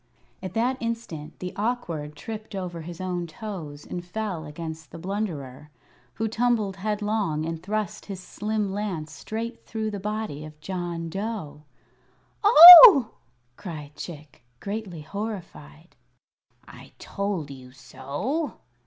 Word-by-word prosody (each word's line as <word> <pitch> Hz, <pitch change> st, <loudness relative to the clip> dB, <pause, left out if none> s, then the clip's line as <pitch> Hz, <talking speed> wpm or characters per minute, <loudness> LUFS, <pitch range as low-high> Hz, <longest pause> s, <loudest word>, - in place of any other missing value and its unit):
At 185 Hz, -1 st, -7 dB
that 245 Hz, +3 st, +1 dB
instant 230 Hz, -10 st, -5 dB
the 180 Hz, 0 st, -6 dB
Awkward 175 Hz, -10 st, -3 dB
tripped 215 Hz, +7 st, -8 dB
over 180 Hz, -3 st, -5 dB
his 170 Hz, +1 st, -9 dB
own 180 Hz, -2 st, -3 dB
toes 160 Hz, -5 st, -8 dB
and 175 Hz, -, -6 dB
fell 180 Hz, -3 st, -5 dB
against 160 Hz, -1 st, -8 dB
the 165 Hz, -, -10 dB
Blunderer, 165 Hz, -8 st, -5 dB, 0.5 s
who 225 Hz, -, -1 dB
tumbled 220 Hz, -3 st, 0 dB
headlong 205 Hz, -5 st, -2 dB
and 165 Hz, 0 st, -5 dB
thrust 210 Hz, +1 st, -4 dB
his 195 Hz, -3 st, -6 dB
slim 210 Hz, +1 st, -3 dB
lance 185 Hz, -7 st, -4 dB
straight 225 Hz, -, -6 dB
through 220 Hz, -1 st, -4 dB
the 205 Hz, -, -5 dB
body 210 Hz, -7 st, -4 dB
of 155 Hz, 0 st, -12 dB
John 175 Hz, -1 st, -5 dB
Dough. 175 Hz, -6 st, -5 dB, 0.8 s
"Oh!" 355 Hz, -, +11 dB, 0.5 s
cried 155 Hz, -7 st, -8 dB
Chick, 150 Hz, -7 st, -10 dB, 0.2 s
greatly 200 Hz, -5 st, -6 dB
horrified. 170 Hz, -, -8 dB, 0.7 s
"I -, -, -14 dB
told 195 Hz, -8 st, -4 dB
you 130 Hz, -2 st, -12 dB
so!" 145 Hz, -, -4 dB
185 Hz, 125 wpm, -25 LUFS, 155-215 Hz, 0.8 s, Oh